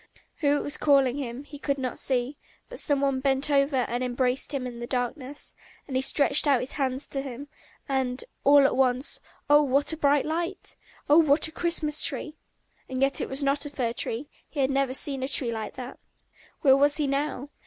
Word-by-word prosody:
Who 290 -2 +2
it - - -2
was 290 - -1
calling 275 -3 +3
him, 255 -1 -5
he 290 0 -12
could 280 -1 -1
not 255 -2 -3
see, 260 +2 -1 0.3
but - - -2
some 285 -2 +2
one 275 -2 +1
bent 270 +2 +1
over 275 0 +2
and 245 +2 -3
embraced 250 +2 0
him 275 -3 -3
in 240 -1 -7
the 240 - -6
darkness; 255 +3 -4 0.3
and 270 - -6
he 260 - +2
stretched 285 +2 +3
out 275 -3 +4
his 255 - -4
hands 265 0 -2
to 275 - -3
him, 275 +1 -8 0.4
and... 265 -2 0
and 250 +1 -4 0.2
all 285 0 +6
at 275 - +2
once 255 +1 +1 0.3
oh, 290 +1 +6
what 285 +2 +1
a - - -5
bright 285 -2 +2
light! 340 +4 -4 0.3
Oh, 295 +3 +6
what 305 -1 +4
a - - -11
Christmas 320 -3 +2
tree! 305 - -2 0.5
And 260 0 -4
yet 275 0 +2
it - - -4
was 270 +2 -1
not 280 +1 +1
a - - -7
fir 245 -5 -2
tree, 240 +4 -2 0.2
he 295 - -7
had 265 0 +1
never 270 -1 0
seen 275 -1 -1
a 260 - -2
tree 260 -3 +1
like 220 -1 -5
that! 255 0 -8 0.6
Where 265 -3 +6
was 285 +1 +4
he 300 - 0
now? 280 0 -2
275 Hz, 215 wpm, -26 LUFS, 260-290 Hz, 0.6 s, all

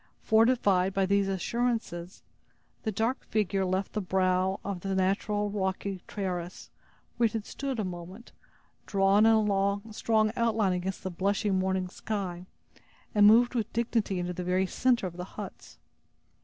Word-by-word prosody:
Fortified 220 -5 +3
by 195 -1 +3
these 200 +1 +2
assurances, 195 -3 -2 0.6
the 220 - -2
dark 225 +5 -1
figure 200 -2 0
left 185 +1 -1
the 210 - -1
brow 185 0 +1
of 200 -3 -4
the 195 +2 -2
natural 200 +2 0
rocky 190 -1 -2
terrace, 180 -3 -5 0.5
where 240 - +3
it 215 - -8
had 220 -2 -3
stood 275 -4 -4
a - - 0
moment, 185 +4 -8 0.6
drawn 200 +2 +4
in 220 -1 +4
a 200 +2 0
strong 215 0 +2
outline 225 -5 +1
against 180 +1 -3
the 185 - -3
blushing 195 +2 0
morning 190 0 0
sky, 185 -2 -5 0.7
and 205 -1 +6
moved 235 +4 +6
with 225 -4 -2
dignity 225 -4 0
into 180 0 -2
the 180 - -5
very 180 +1 +1
center 245 +2 +1
of 175 -1 -6
the 180 - -4
huts. - - -9
195 Hz, 155 wpm, -29 LUFS, 185-220 Hz, 0.7 s, and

